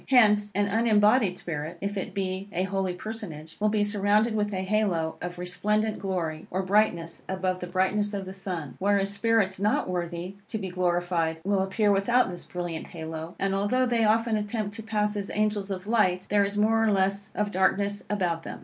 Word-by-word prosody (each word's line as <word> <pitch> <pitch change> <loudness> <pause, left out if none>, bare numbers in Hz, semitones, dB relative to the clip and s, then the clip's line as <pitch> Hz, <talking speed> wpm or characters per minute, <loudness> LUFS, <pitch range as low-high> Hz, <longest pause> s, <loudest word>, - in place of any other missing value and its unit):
Hence, 210 -5 +5
an 205 +1 +3
unembodied 210 -1 +3
spirit, 155 -1 -4
if 200 +1 -3
it 190 0 -4
be 190 0 -2
a 185 -2 0
holy 190 -1 -1
personage, 180 -7 -7
will 215 +1 +3
be 210 -1 +2
surrounded 205 +2 +2
with 210 -1 0
a 190 -1 -2
halo 190 -6 0
of 175 0 -5
resplendent 210 +5 0
glory, 175 -5 -3
or 190 +2 -1
brightness, 185 -4 +1
above 185 -1 -1
the 180 - -5
brightness 190 +3 +1
of 195 -1 -4
the 190 - -7
sun. 175 -8 -5
Whereas, 200 0 +1
spirits 200 -3 +1
not 210 +2 +1
worthy 175 +1 -4
to 220 - -3
be 195 -3 -4
glorified 175 -2 0
will 195 0 +1
appear 205 +2 +2
without 200 +2 +3
this 175 - -8
brilliant 175 -2 -5
halo; 160 0 -6
and, 195 0 0
although 205 +6 +2
they 240 -2 +2
often 220 +1 +3
attempt 210 0 -3
to - - -5
pass 210 -1 0
as 200 -1 -3
angels 210 -1 0
of 185 -1 -4
light, 185 -5 +2
there 205 -1 +5
is 200 +1 -2
more 225 +2 +3
or 220 - +3
less 195 0 +1
of 210 -1 0
darkness 200 +1 +1
about 180 -5 0
them. - - -7
195 Hz, 195 wpm, -27 LUFS, 180-210 Hz, -, Hence